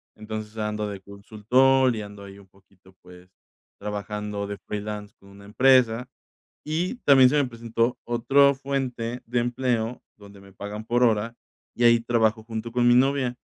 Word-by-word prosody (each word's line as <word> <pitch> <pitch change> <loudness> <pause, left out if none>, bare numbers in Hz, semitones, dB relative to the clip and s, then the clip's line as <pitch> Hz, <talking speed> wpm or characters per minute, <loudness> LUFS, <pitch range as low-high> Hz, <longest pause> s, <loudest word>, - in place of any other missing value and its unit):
entonces 110 0 -7
ando 105 0 -2
de 100 - -7
consultor 115 +6 +1
y 110 - -4
ando 100 -1 -10
ahí 100 0 -12
un 100 - -18
poquito, 95 0 -24
pues, 90 0 -16 0.5
trabajando 105 0 -5
de 100 0 -6
freelance 105 0 -7
con 100 - -19
una 100 0 -15
empresa. 125 +1 +3 0.6
Y 170 +9 -2
también 130 -3 +7
se - - 0
me 140 - +2
presentó 115 0 -2
otro 135 +4 +3
fuente 125 -3 -4
de 120 +1 0
empleo 120 -1 -2 0.2
donde 100 -1 -15
me 100 -1 -17
pagan 105 +2 -7
por 120 +2 +1
hora, 115 0 +1 0.4
y 120 - -1
ahí 120 0 +6
trabajo 115 -1 0
junto 115 0 -6
con 120 0 +2
mi 120 - +6
novia. 130 -1 +2
115 Hz, 165 wpm, -24 LUFS, 105-125 Hz, 0.6 s, también